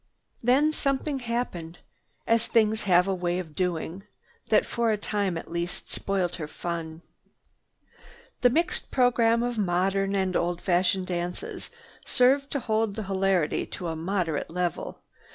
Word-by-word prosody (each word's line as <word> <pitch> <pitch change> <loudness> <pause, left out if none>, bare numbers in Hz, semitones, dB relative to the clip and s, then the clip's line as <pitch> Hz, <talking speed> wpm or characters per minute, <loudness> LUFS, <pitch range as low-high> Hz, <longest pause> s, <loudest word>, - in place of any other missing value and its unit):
Then 270 +6 +4
something 275 0 -1
happened, 230 -9 -3 0.5
as 230 0 +2
things 220 -2 +3
have 180 +1 +5
a 195 - +1
way 175 -1 -1
of 170 -4 -5
doing, 180 +1 -2 0.5
that - - +4
for 235 -1 0
a 215 - +2
time 200 -4 -1
at 165 - -8
least 170 +1 -3
spoiled 190 -3 -1
her 155 -4 -5
fun. 165 0 -5 1.4
The 245 - +6
mixed 335 +8 0
program 235 -2 +3
of 240 -2 -2
modern 195 +1 +1
and 190 -2 0
old 175 0 0
fashioned 185 +1 +2
dances 175 -1 -4 0.3
served 275 +3 +3
to 280 - -2
hold 220 -3 0
the 220 - -3
hilarity 190 -4 +1
to 175 -2 -5
a 160 - -3
moderate 165 -2 -1
level. 175 +1 -3
195 Hz, 145 wpm, -27 LUFS, 175-230 Hz, 1.4 s, The